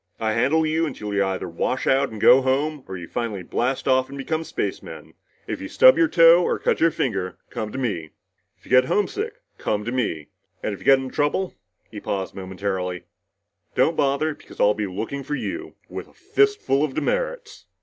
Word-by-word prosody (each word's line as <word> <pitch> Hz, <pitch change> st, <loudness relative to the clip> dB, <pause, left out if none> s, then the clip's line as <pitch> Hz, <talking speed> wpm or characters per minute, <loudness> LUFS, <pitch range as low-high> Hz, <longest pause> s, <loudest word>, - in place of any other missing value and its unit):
I 110 Hz, -1 st, 0 dB
handle 140 Hz, +8 st, +2 dB
you 160 Hz, +1 st, +1 dB
until 105 Hz, -7 st, -5 dB
you 100 Hz, 0 st, +2 dB
either 95 Hz, -1 st, -2 dB
wash 85 Hz, +9 st, -2 dB
out 135 Hz, +1 st, +3 dB
and 110 Hz, -, -8 dB
go 130 Hz, +5 st, +7 dB
home, 140 Hz, +2 st, 0 dB
or 95 Hz, -, -6 dB
you 85 Hz, -1 st, -8 dB
finally 105 Hz, -4 st, -3 dB
blast 130 Hz, +9 st, -1 dB
off 130 Hz, -1 st, +3 dB
and 140 Hz, -, -8 dB
become 160 Hz, +4 st, -2 dB
spacemen. -, -, -5 dB, 0.3 s
If -, -, -5 dB
you -, -, -5 dB
stub -, -, +7 dB
your 335 Hz, -, +4 dB
toe 170 Hz, -, +7 dB
or -, -, 0 dB
cut -, -, 0 dB
your 165 Hz, -, +5 dB
finger, 100 Hz, -, -2 dB
come 110 Hz, -1 st, -4 dB
to -, -, -6 dB
me. 100 Hz, -, -2 dB, 0.5 s
If -, -, -26 dB
you -, -, -14 dB
get 130 Hz, 0 st, +6 dB
homesick, 400 Hz, -, -1 dB, 0.2 s
come 105 Hz, 0 st, -1 dB
to 120 Hz, -, -2 dB
me. 95 Hz, -, -2 dB, 0.3 s
And 105 Hz, -, -1 dB
if 100 Hz, -, -8 dB
you -, -, -14 dB
get 135 Hz, -, +7 dB
into 130 Hz, -1 st, -6 dB
trouble" 150 Hz, +6 st, 0 dB, 0.4 s
he 105 Hz, -, -7 dB
paused 95 Hz, -2 st, -3 dB
momentarily 95 Hz, -1 st, -4 dB, 0.7 s
"don't -, -, +3 dB
bother 140 Hz, +3 st, +1 dB
because -, -, -16 dB
I'll 105 Hz, -, +5 dB
be 105 Hz, -1 st, -3 dB
looking 110 Hz, +9 st, -4 dB
for 150 Hz, +2 st, -3 dB
you, 340 Hz, -, -5 dB
with -, -, -7 dB
a -, -, -22 dB
fist 415 Hz, 0 st, +1 dB
full 135 Hz, +2 st, +2 dB
of 145 Hz, -4 st, -2 dB
demerits!" -, -, -2 dB
130 Hz, 205 wpm, -23 LUFS, 105-155 Hz, 0.7 s, go